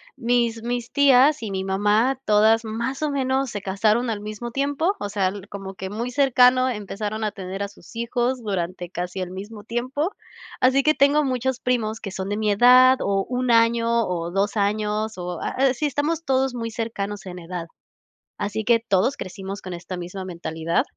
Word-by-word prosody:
Mis 235 -2 0
mis 240 0 -3
tías 280 -1 +5
y 215 - -4
mi 190 0 -2
mamá, 210 +7 +2
todas 220 +2 +4
más 235 +5 -3
o 305 - +1
menos 265 -1 0
se 205 -3 -5
casaron 215 +5 +1
al 210 -2 -3
mismo 215 +3 -6
tiempo, 285 - 0
o 205 - -4
sea 195 -2 +1
l 200 +1 -6
como 195 -1 -7
que 190 0 -6
muy 235 +4 -4
cercano 255 -1 +4
empezaron 210 -1 -4
a 210 - -1
tener 195 0 -5
a - - -2
sus 205 - -17
hijos 240 +2 -1
durante 180 -4 -3
casi 180 +1 -5
el 185 -1 -4
mismo 205 +3 -8
tiempo, 255 - -2 0.5
así 260 +2 +4
que 305 - +4
tengo 290 +1 +4
muchos 260 -1 -1
primos 225 -3 -1
que 195 - -6
son 190 +1 -4
de 205 - -1
mi 215 -1 +1
edad 255 +4 +7
o 195 -1 0
1 250 0 0
año 230 0 +3
o 170 -1 -3
2 200 +2 0
años, 210 +1 0
o 180 -1 -5
a - - -2
así 265 +2 +1
estamos 295 +4 -1
todos 265 -2 +1
muy 230 -2 -4
cercanos 210 -3 -4
en 180 -1 -7
edad, 170 0 -6 0.7
así 210 +2 -3
que 235 0 +4
todos 225 +4 +1
crecimos 195 +2 -6
con 185 - -7
esta 175 +1 -6
misma 180 +2 -6
mentalidad, 165 -2 -1
220 Hz, 190 wpm, -23 LUFS, 195-250 Hz, 0.7 s, edad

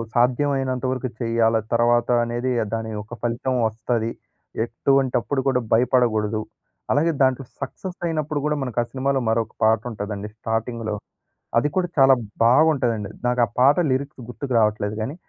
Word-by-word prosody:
సాధ్యమైనంత 130 +1 +1
వరకు 130 0 -2
చేయాల, 115 -1 +2 0.2
తర్వాత 120 0 +3
అనేది 120 +2 -2 0.2
దానియొక్క 110 0 -4
ఫలితం 120 +2 -1
వస్తది. 115 +1 -2 0.5
ఎటువంటప్పుడు 135 +2 +1
కూడా 125 - +2
భయపడకూడదు. 115 -3 +2 0.5
అలాగే 160 +5 +3
దాంట్లో 130 0 +3 0.2
సక్సెసయినప్పుడు 155 -1 -3
గూడా, 150 0 +1
మనకా 120 -2 -1
సినిమాలో 135 +1 0
మరొక 115 -1 0
పాట 110 0 +4
ఉంటదండి 105 0 -5
స్టార్టింగ్‌లో. 115 -1 -2 0.6
అది 130 +6 +3
కూడా 185 -1 +1
చాలా 135 0 +7 0.3
బావుంటదండి. 120 -5 +3 0.2
నాకా 125 -1 +2 0.2
పాట 135 +3 +6 0.2
లిరిక్స్ 135 0 -2
గుర్తుకు 130 +1 -5
రావట్లేదు 105 -1 +1
గాని, 135 +8 -3
120 Hz, 120 wpm, -23 LUFS, 115-135 Hz, 0.6 s, చాలా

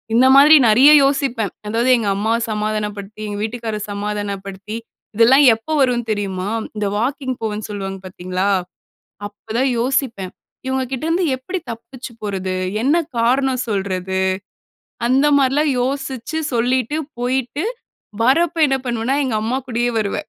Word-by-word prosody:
இந்த 255 +3 +5
மாரி 295 +3 +8
நிறைய 260 +7 +7
யோசிப்பேன். 270 -7 0 0.2
அதாவது, 230 +4 0
எங்க 220 -3 -2
அம்மாவ 220 +3 +1
சமாதானப்படுத்தி, 210 -1 -3
எங்க 205 -1 -4
வீட்டுக்கார 225 -1 -4
சமாதானப்படுத்தி, 200 0 -5 0.4
இதெல்லாம் 245 +6 +6
எப்போ 225 +8 -9
வரும் 245 -3 +1
தெரியுமா? 195 -2 -2 0.3
இந்த 210 -1 -1
வாக்கிங் 260 +2 -2
போவேன்னு 215 -1 -3
சொல்வாங்க, 195 -2 -5
பார்த்தீங்களா? 185 +1 -3 0.8
அப்ப 205 +1 -14
தான் 265 0 +2
யோசிப்பேன், 235 -6 -1 0.3
"இவங்க 260 0 0
கிட்டேருந்து 330 +7 0
எப்படி 360 +9 -5
தப்பிச்சு 235 +2 -10
போறது? 190 -2 -3 0.3
என்ன 290 +6 +3 0.2
காரணம் 255 +2 +1
சொல்றது?" 190 -2 -2 0.9
அந்த 270 +4 +3
மாரிலாம் 280 +2 +2
யோசிச்சு 270 +2 -3
சொல்லிட்டு, 250 +4 0 0.2
போய்ட்டு 260 - -1 0.6
வரப்போ 330 +6 +2
என்ன 270 0 +1
பண்ணுவேனா, 240 +3 -1
எங்க 250 -4 -2
அம்மா 245 +4 -1
கூடயே 240 0 0
வருவேன். 215 +8 -3
235 Hz, 125 wpm, -19 LUFS, 205-265 Hz, 0.9 s, மாரி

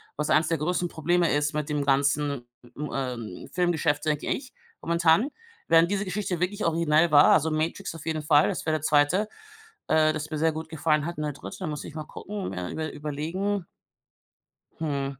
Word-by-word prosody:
was 150 0 -2
eins 155 +1 +4
der 165 - +1
größten 175 +3 0
Probleme 170 +2 +1
ist 145 +1 +1
mit 150 0 -2
dem 145 -1 -1
ganzen, 140 -1 +1 0.3
m 150 +1 -4
ähm, 120 -8 -4
Filmgeschäft, 165 -4 +1
denke 150 -1 0
ich, 265 0 -3 0.3
momentan. 170 - +3 0.4
Während 165 +1 +5
diese 205 0 -1
Geschichte 185 -1 -2
wirklich 200 +4 -1
originell 165 0 +3
war, 145 -1 +7
also 160 +1 +3
„Matrix“ 160 +4 -2
auf 160 - -10
jeden 160 -1 -1
Fall, 150 0 +4
das - - -4
wäre 155 - +2
der 155 - -2
2., 155 +7 +3 0.6
äh, 155 0 +4
das 155 0 -4
mir 155 - -2
sehr 160 +1 +3
gut 160 +1 -6
gefallen 155 -1 +1
hat. 170 -1 -5
Und 150 - -2
der 150 - -2
3., 185 +7 -7
muss 150 -2 -4
ich 155 - -10
mal 155 - -4
gucken 205 - -6
äh, 90 -1 -4
über 155 -1 -3
überlegen. 165 +7 -3 1.1
Hm. 140 -4 -2
155 Hz, 190 wpm, -26 LUFS, 150-170 Hz, 1.1 s, war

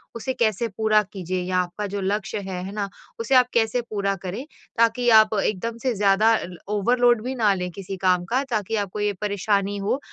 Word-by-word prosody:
उसे 260 +3 -3
कैसे 230 -1 0
पूरा 215 -1 +4
कीजिए 185 -1 -3
या 185 0 -1
आपका 180 +4 -3
जो 200 - -2
लक्ष्य 200 +2 -2
है, 190 -2 -5
है 195 - -6
ना? 205 -2 -3 0.3
उसे 365 - +1
आप 250 -1 +6
कैसे 230 +1 +2
पूरा 200 -2 -1
करें 190 +8 -4 0.3
ताकि 230 +1 +3
आप 215 0 -1
एकदम 225 +3 -2
से 255 -2 +1
ज़्यादा 205 +3 +4
ल 175 -1 -10 0.2
ओवरलोड 240 +2 +3
भी 260 +1 -3
ना 215 -4 +3
लें 180 -1 -3
किसी 195 +1 -7
काम 180 -1 +3
का 255 +8 0
ताकि 215 -1 -1
आपको 205 -1 -3
ये 205 0 0
परेशानी 200 0 0
हो 200 +7 -1
210 Hz, 200 wpm, -23 LUFS, 195-230 Hz, 0.3 s, आप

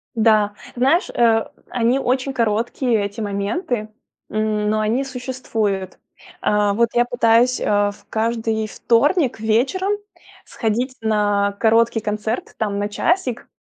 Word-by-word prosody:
Да, 215 -2 +3 0.2
знаешь, 270 +8 +2
э, 225 -2 +3 0.2
они 245 +2 +1
очень 260 +1 -1
короткие, 230 0 0
эти 205 +3 -6
моменты, 210 - -2 0.4
м, 215 -1 0
но 215 0 +1
они 220 +5 +1
существуют. 245 -7 -3 0.4
Э, 210 -1 +2
вот 235 +2 +2
я 240 0 +3
пытаюсь, 240 +1 +3
э, - - -3 0.3
в 205 0 -18
каждый 220 0 -1
вторник 255 - +1
вечером 250 - +1 0.5
сходить 240 +3 -2
на 205 -2 +1
короткий 225 0 +3
концерт, 215 +3 -3
там, 205 -2 -1
на 205 0 -1
часик. 260 - -1
225 Hz, 125 wpm, -20 LUFS, 210-245 Hz, 0.5 s, Да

